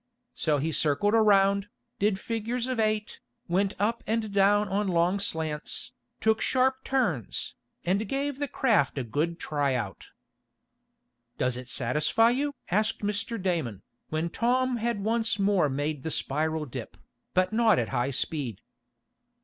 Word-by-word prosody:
So 150 -2 +1
he 155 +4 -1
circled 160 +8 +2
around, 200 -2 +4 0.3
did 200 -1 +2
figures 230 +3 -2
of 255 -2 -2
eight, 215 -1 0 0.3
went 195 +3 +1
up 220 +4 0
and 220 -1 -1
down 205 +1 +4
on 200 +2 0
long 180 +2 +2
slants, 160 -5 -2 0.3
took 220 0 +2
sharp 260 0 +2
turns, 185 - -1 0.3
and 195 +4 0
gave 275 0 -2
the 285 - -1
craft 220 - +2
a 135 - 0
good 150 +9 -1
tryout. 130 - -2 1.3
"Does 125 -1 0
it 125 0 -8
satisfy 150 - +2
you?" 285 +3 -1 0.2
asked 215 +4 +1
Mr. 210 +2 -2
Damon, 160 - -2 0.3
when 160 +2 -1
Tom 250 +3 +1
had 230 -3 -1
once 225 0 +1
more 195 -6 +3
made 145 +1 -2
the 160 - -3
spiral 155 +2 0
dip, 125 - -8 0.4
but 185 +2 +2
not 225 -1 +4
at 115 -3 0
high 125 0 0
speed. 135 - -2
195 Hz, 140 wpm, -28 LUFS, 150-225 Hz, 1.3 s, around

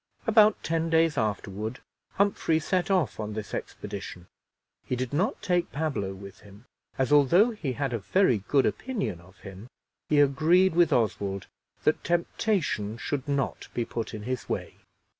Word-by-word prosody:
About 215 -1 +5
ten 165 0 0
days 165 -1 +3
afterward 110 +1 -3 0.3
Humphrey 195 -5 +2
set 180 +4 0
off 180 - +1
on 105 -1 -4
this 105 -1 -6
expedition. 90 -1 -6 0.6
He 125 - -2
did 125 +1 -4
not 185 +9 0
take 175 -1 0
Pablo 140 -11 -2
with 100 0 -11
him, 100 +3 -16 0.3
as, 130 0 0
although 170 - +5
he 160 - -4
had 140 -1 -2
a 115 - -1
very 125 - +2
good 140 -2 +3
opinion 205 - -2
of 90 +2 -19
him, 100 +2 -10 0.4
he 150 - +4
agreed 160 +7 +4
with 170 -1 +4
Oswald 100 -4 0 0.4
that 155 - +2
temptation 170 - -1
should 140 +4 -3
not 140 -2 -2
be 120 - 0
put 115 -1 -5
in 105 - -7
his 125 +1 -4
way. - - -4
140 Hz, 160 wpm, -27 LUFS, 110-170 Hz, 0.6 s, About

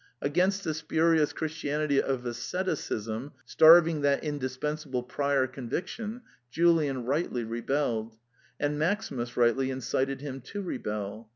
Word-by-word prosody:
Against 185 +7 +1
the 160 - -1
spurious 160 0 +2
Christianity 150 -2 0
of 130 -2 -2
as 120 -1 -3
ceticism, 135 - -3
starving 160 -1 +6
that 140 -1 +2
indispensable 145 -1 -3
prior 140 +1 +1
convic 130 +6 -4
tion, 225 +4 -6 0.3
Julian 150 -4 +2
rightly 135 -3 -1
rebelled; 115 -1 -2 0.4
and 145 0 -1
Maximus 145 - -1
rightly 125 +2 +3
incited 130 +1 -1
him 135 -2 -6
to 205 0 -5
rebel. 105 - -5
140 Hz, 120 wpm, -28 LUFS, 125-160 Hz, 0.4 s, starving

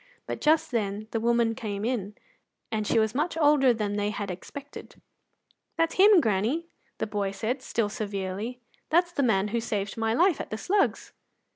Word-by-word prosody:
But - - -5
just 310 -1 +3
then 210 -2 -2
the 225 - -1
woman 235 0 +2
came 215 -4 -4
in, 210 -5 -2 0.6
and 215 -1 -1
she - - +2
was 220 -1 +2
much 310 +5 -1
older 290 -4 +5
than 210 -3 -2
they 205 0 0
had 205 -2 -4
expected. 280 +10 -10 0.8
"That's 330 0 +2
him, 400 0 +7
granny," 225 - 0 0.3
the - - -1
boy 205 -2 -2
said, 220 +7 -3
still 230 -4 -1
severely; 205 +3 -4 0.3
"that's 345 +2 +3
the 285 - -1
man 210 -5 +2
as 230 +1 -1
saved 205 -2 -3
my 225 0 0
life 355 +2 +3
at - - -8
the 215 - -4
Slugs." 395 - 0
225 Hz, 175 wpm, -27 LUFS, 205-280 Hz, 0.8 s, him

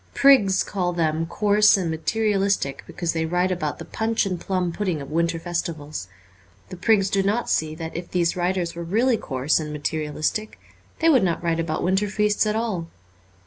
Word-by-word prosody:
Prigs 210 -9 +5
call 180 -3 -2
them 165 -1 0
coarse 210 +3 +4
and 175 -4 -1
materialistic 195 -3 0
because 170 -2 -3
they 160 -1 -1
write 180 +2 +1
about 155 -5 -2
the - - -8
punch 225 0 -1
and 185 -3 -3
plum 185 -2 -1
pudding 180 -3 -2
of 140 +1 -8
winter 170 +1 +1
festivals. 165 - -4 0.6
The - - -7
prigs 195 +1 +3
do 195 0 +1
not 210 +5 0
see 155 0 0
that 160 0 -7
if 170 +1 -5
these 170 -2 +1
writers 180 -1 -1
were 170 - -7
really 230 +9 +2
coarse 135 -2 0
and 155 -1 -5
materialistic 155 +7 -3 0.4
they 330 - +5
would 265 -9 +5
not 175 -2 0
write 165 -1 0
about 165 -1 -2
winter 190 +3 +1
feasts 210 +1 +1
at 210 - 0
all. 215 -7 -2
180 Hz, 185 wpm, -23 LUFS, 165-205 Hz, 0.6 s, Prigs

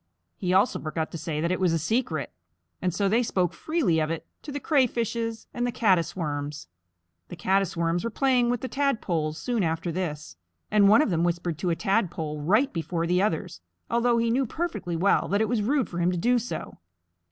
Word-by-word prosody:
He 180 -3 -2
also 190 +6 +3
forgot 160 0 -3
to - - -5
say 150 -2 -3
that 170 +2 0
it 185 - 0
was 180 -3 +2
a - - +2
secret, 165 - -1 0.5
and 180 - +1
so 195 +4 0
they 225 +5 +3
spoke 180 -7 0
freely 295 - 0
of 155 0 0
it 165 -1 -4 0.2
to 295 - -8
the 285 - -3
Crayfishes 235 -5 0
and 240 - -2
the - - -1
Caddis 190 -8 +2
Worms. 150 -3 -4 0.6
The - - -7
Caddis 190 0 0
Worms 170 +2 0
were 230 - -1
playing 250 0 +2
with 245 -1 0
the 260 - -3
Tadpoles 180 - -1
soon 235 +6 -1
after 165 0 -1
this, 155 - -4 0.3
and 205 -2 +5
one 220 +8 +7
of 225 - -1
them 165 -1 +1
whispered 170 -2 -1
to 180 - -1
a 170 - +1
Tadpole 175 -7 -1
right 215 - +2
before 165 0 -2
the 180 +2 +2
others, 160 - -2 0.3
although 235 0 +3
he 230 0 +1
knew 260 +2 +1
perfectly 215 - -3
well 185 +5 +2
that 200 - +1
it 220 - +2
was 230 -2 0
rude 255 +1 +1
for 175 - -5
him 175 +1 +2
to 180 - -1
do 245 +7 +3
so. 240 - -6
185 Hz, 210 wpm, -26 LUFS, 165-235 Hz, 0.6 s, one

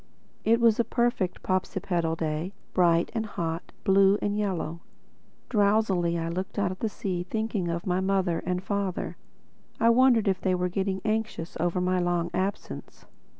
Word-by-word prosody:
It 230 +1 +4
was 230 -2 +4
a - - +5
perfect 235 -7 0
Popsipetel 180 -3 -1
day, 160 +4 -2 0.2
bright 170 -2 +3
and 225 -2 -1
hot, 170 -5 -4
blue 195 +1 +5
and 205 0 -1
yellow. 180 -6 -2 0.7
Drowsily 200 -6 +2
I 165 0 -2
looked 185 +5 -4
out 185 -2 -1
to 225 - -1
sea 195 -5 -3
thinking 215 0 -2
of 170 +1 -3
my 180 -1 +1
mother 190 -3 +1
and 180 +1 -2
father. 200 -2 -2 0.6
I 230 +1 +5
wondered 240 -3 +4
if 190 -1 +1
they 185 -1 +2
were 180 0 0
getting 190 +1 -1
anxious 215 -6 -2
over 175 +2 +1
my 180 0 +1
long 175 -1 0
absence. 190 +2 -4
190 Hz, 155 wpm, -27 LUFS, 175-210 Hz, 0.7 s, a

